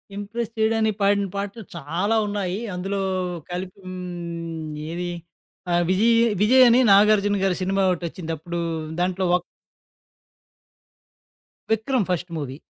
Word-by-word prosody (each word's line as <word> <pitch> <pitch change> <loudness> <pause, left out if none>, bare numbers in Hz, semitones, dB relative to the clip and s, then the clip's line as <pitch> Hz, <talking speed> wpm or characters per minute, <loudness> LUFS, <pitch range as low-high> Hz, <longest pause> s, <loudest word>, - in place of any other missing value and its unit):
Impress 215 +3 -4
చేయడానికి 220 -1 +2
పాడిన 200 0 +3
పాటలు 200 +3 -4
చాలా 170 +8 -1
ఉన్నాయి. 200 -2 -2 0.2
అందులో 195 +2 -2 0.5
కలిపి 180 +2 -5
హ్మ్, 170 -3 -6 0.2
ఏది? 175 +1 -3 0.6
ఆ! - - +1 0.2
'విజయ్', 230 +5 +4 0.2
'విజయ్' 255 +5 +7
అని 235 +2 +5
నాగార్జున 205 0 +5
గారి 190 -2 +2
సినిమా 195 +1 +1
ఒకటి 175 -1 -1
వచ్చింది. 165 -1 -6
అప్పుడు 170 +3 -5 0.4
దాంట్లో 185 +1 0
వోక్ 180 0 +3 2.3
'విక్రమ్' 220 0 +1
ఫస్ట్ 175 0 -2
మూవీ. 140 -3 -5
190 Hz, 120 wpm, -23 LUFS, 175-210 Hz, 2.3 s, విజయ్